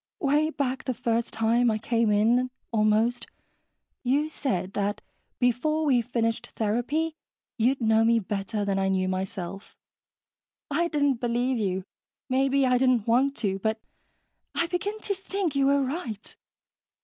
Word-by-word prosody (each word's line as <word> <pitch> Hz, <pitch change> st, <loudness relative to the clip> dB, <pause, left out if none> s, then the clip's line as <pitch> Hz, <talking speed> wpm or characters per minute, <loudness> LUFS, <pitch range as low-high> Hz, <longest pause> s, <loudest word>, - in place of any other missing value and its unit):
"Way 300 Hz, -1 st, +2 dB
back 265 Hz, -4 st, -2 dB
the 255 Hz, -, -1 dB
first 230 Hz, 0 st, -1 dB
time 230 Hz, +2 st, +2 dB
I 215 Hz, -, +1 dB
came 230 Hz, 0 st, +1 dB
in, 235 Hz, +5 st, +3 dB, 0.2 s
almost, 220 Hz, +2 st, +2 dB, 0.7 s
you 285 Hz, +4 st, +1 dB
said 195 Hz, -, -2 dB
that 205 Hz, 0 st, -2 dB, 0.3 s
before 305 Hz, +6 st, +1 dB
we 255 Hz, -5 st, +4 dB
finished 230 Hz, -1 st, -1 dB
therapy, 245 Hz, +9 st, 0 dB, 0.4 s
you'd 255 Hz, +3 st, +2 dB
know 220 Hz, 0 st, +4 dB
me 230 Hz, +1 st, +4 dB
better 205 Hz, 0 st, -2 dB
than 195 Hz, -1 st, 0 dB
I 190 Hz, -, +1 dB
knew 190 Hz, -1 st, +1 dB
myself. 190 Hz, 0 st, -5 dB, 0.9 s
I 335 Hz, +4 st, +2 dB
didn't 285 Hz, -6 st, +1 dB
believe 245 Hz, +1 st, 0 dB
you 190 Hz, -3 st, -1 dB, 0.5 s
maybe 270 Hz, +1 st, +2 dB
I 250 Hz, -1 st, +3 dB
didn't 255 Hz, -4 st, +3 dB
want 265 Hz, +4 st, +3 dB
to 195 Hz, -1 st, 0 dB
but 220 Hz, +2 st, -1 dB, 0.8 s
I 335 Hz, -, +2 dB
begin 400 Hz, +5 st, -3 dB
to 405 Hz, -, -1 dB
think 385 Hz, -4 st, -3 dB
you 275 Hz, 0 st, +3 dB
were 280 Hz, 0 st, +3 dB
right. 255 Hz, -, -5 dB
240 Hz, 145 wpm, -26 LUFS, 215-275 Hz, 0.9 s, we